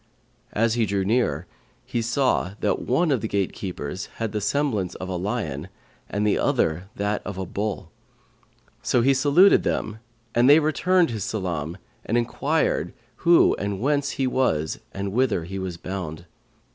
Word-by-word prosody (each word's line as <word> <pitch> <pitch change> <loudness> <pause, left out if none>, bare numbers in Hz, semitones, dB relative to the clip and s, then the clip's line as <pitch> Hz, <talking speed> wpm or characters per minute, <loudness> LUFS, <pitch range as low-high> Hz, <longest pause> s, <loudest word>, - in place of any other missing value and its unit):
As 115 +1 +2
he 115 -2 +1
drew 100 0 0
near, 100 - +1 0.4
he 120 - -2
saw 120 -5 +1
that - - +1
one 155 +6 +1
of 130 - +1
the 110 - -2
gatekeepers 95 -3 -3
had 115 -2 -3
the 105 - -2
semblance 105 -5 0
of 95 - -6
a 95 - -2
lion 90 - -3 0.4
and 105 +1 -1
the 105 - +2
other 85 +5 0
that 105 +1 -1
of 100 - -6
a 95 - -3
bull; 100 -2 -4 0.9
so 120 - +2
he 135 +2 +5
saluted 145 +9 +5
them 110 0 -2 0.3
and 120 +3 +4
they 145 - +9
returned 165 +1 +2
his 110 -4 -3
salam 90 -6 -3 0.3
and 115 - 0
enquired 120 -1 0 0.2
who 170 0 +5
and 100 -1 -2
whence 140 +3 +1
he 135 - +1
was 100 -13 0
and 100 0 -4
whither 115 -6 +1
he 95 +3 -5
was 95 -3 -4
bound. 85 -3 -6
105 Hz, 160 wpm, -24 LUFS, 95-125 Hz, 0.9 s, they